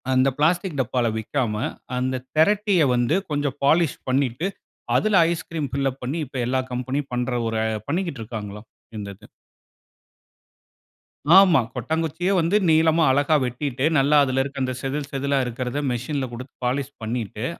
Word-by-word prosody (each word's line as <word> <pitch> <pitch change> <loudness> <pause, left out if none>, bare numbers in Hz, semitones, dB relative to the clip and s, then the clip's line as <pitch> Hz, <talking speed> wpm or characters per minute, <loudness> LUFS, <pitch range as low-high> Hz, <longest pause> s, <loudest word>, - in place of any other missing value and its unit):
அந்த 130 +1 +3
பிளாஸ்டிக் 170 +2 +1
டப்பால 125 -1 0
விக்காம 110 0 -2 0.4
அந்த 130 0 -1
திரட்டிய 195 +1 +3
வந்து 120 +6 +2 0.2
கொஞ்சம் 145 -2 -1
பாலிஷ் 160 0 +3
பண்ணிட்டு 135 +5 0 0.5
அதில 215 -4 +4
ஐஸ்கிரீம் 165 -4 -4
ஃபில் 135 0 +1
அப் 130 - -17
பண்ணி 135 +6 -2
இப்ப 130 0 -6
எல்லா 130 +2 +1
கம்பெனி 130 +3 -2
பண்ற 125 +1 -1
ஒரு 115 -1 -1 0.3
பண்ணிக்கிட்டு 165 -3 -2
இருக்காங்கலாம். 105 -1 -7 0.3
இந்த 100 -1 -5
இது. - - -17 2.1
ஆமா. 185 -6 +7
கொட்டாங்குச்சியே 160 - -1
வந்து 170 +4 +1
நீளமா 160 +1 +4
அழகா 145 +3 +3
வெட்டிட்டு, 130 +1 -2
நல்லா 140 +2 +3
அதில 135 -1 +1
இருக்கிற 140 0 -6
அந்த 130 0 -1
செதில், 140 +1 -3
செதிலா 140 0 0
இருக்கிறத 125 +3 -3
மெஷின் 130 +4 -2
ல 130 - -2
குடுத்து 125 +2 -9
பாலிஷ் 135 +2 -1
பண்ணிட்டு, 110 0 -3
135 Hz, 145 wpm, -23 LUFS, 125-155 Hz, 2.1 s, ஆமா